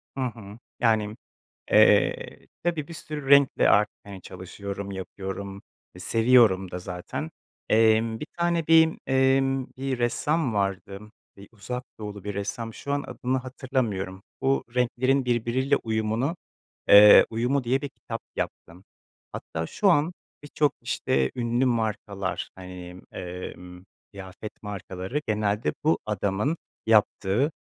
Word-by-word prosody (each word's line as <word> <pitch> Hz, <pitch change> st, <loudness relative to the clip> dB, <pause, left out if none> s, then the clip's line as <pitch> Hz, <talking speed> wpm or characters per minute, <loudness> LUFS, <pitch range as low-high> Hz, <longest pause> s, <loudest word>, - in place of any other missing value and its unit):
Hı 135 Hz, -, -3 dB
hı. 110 Hz, -4 st, -8 dB, 0.2 s
Yani, 110 Hz, -3 st, +2 dB, 0.6 s
eee, -, -, +3 dB, 0.2 s
tabii, 165 Hz, -4 st, -1 dB
bir 170 Hz, -, -8 dB
sürü 150 Hz, -3 st, -6 dB
renkle 140 Hz, -1 st, +5 dB
art 105 Hz, +1 st, +5 dB, 0.2 s
hani 100 Hz, -2 st, -10 dB
çalışıyorum, 100 Hz, +2 st, -7 dB
yapıyorum; 95 Hz, +1 st, -6 dB, 0.3 s
e, 90 Hz, -, -12 dB
seviyorum 110 Hz, -3 st, +4 dB
da 90 Hz, -, -4 dB
zaten. 90 Hz, -1 st, -6 dB, 0.4 s
Emm, 110 Hz, 0 st, +3 dB
bir 150 Hz, -, -5 dB
tane 170 Hz, -2 st, 0 dB
bir, 160 Hz, 0 st, +5 dB
emm, 135 Hz, 0 st, +2 dB
bir 135 Hz, -1 st, -2 dB
ressam 130 Hz, +2 st, 0 dB
vardı, 100 Hz, 0 st, -2 dB, 0.4 s
bir 100 Hz, 0 st, -13 dB
Uzak 125 Hz, +4 st, -6 dB
Doğulu 105 Hz, -2 st, -7 dB
bir 105 Hz, -1 st, -4 dB
ressam, 110 Hz, +3 st, -4 dB
şu 140 Hz, -, -5 dB
an 145 Hz, 0 st, 0 dB
adını 125 Hz, +1 st, -2 dB
hatırlamıyorum. 120 Hz, -8 st, -3 dB, 0.2 s
Bu 135 Hz, +1 st, +1 dB
renklerin 130 Hz, +2 st, +1 dB
birbiriyle 125 Hz, +3 st, +1 dB
uyumunu, 110 Hz, +7 st, -1 dB, 0.5 s
eee, 105 Hz, 0 st, +9 dB
uyumu 125 Hz, +4 st, 0 dB
diye 130 Hz, +4 st, +1 dB
bir 145 Hz, -, -3 dB
kitap 115 Hz, -3 st, -7 dB, 0.2 s
yaptı. -, -, -4 dB, 0.6 s
Hatta 80 Hz, 0 st, -5 dB
şu 200 Hz, -2 st, +2 dB
an 160 Hz, +1 st, +3 dB, 0.3 s
birçok 145 Hz, 0 st, 0 dB
işte 65 Hz, -1 st, 0 dB
ünlü 120 Hz, +1 st, +1 dB
markalar, 105 Hz, -5 st, -2 dB
hani, 90 Hz, -1 st, -10 dB
emm, 90 Hz, 0 st, -8 dB, 0.3 s
kıyafet 100 Hz, +2 st, -10 dB
markaları 100 Hz, +4 st, -5 dB
genelde 105 Hz, 0 st, 0 dB
bu 160 Hz, -, +3 dB
adamın 105 Hz, -, -1 dB, 0.3 s
yaptığı, 110 Hz, +5 st, +2 dB
110 Hz, 125 wpm, -26 LUFS, 100-135 Hz, 0.6 s, eee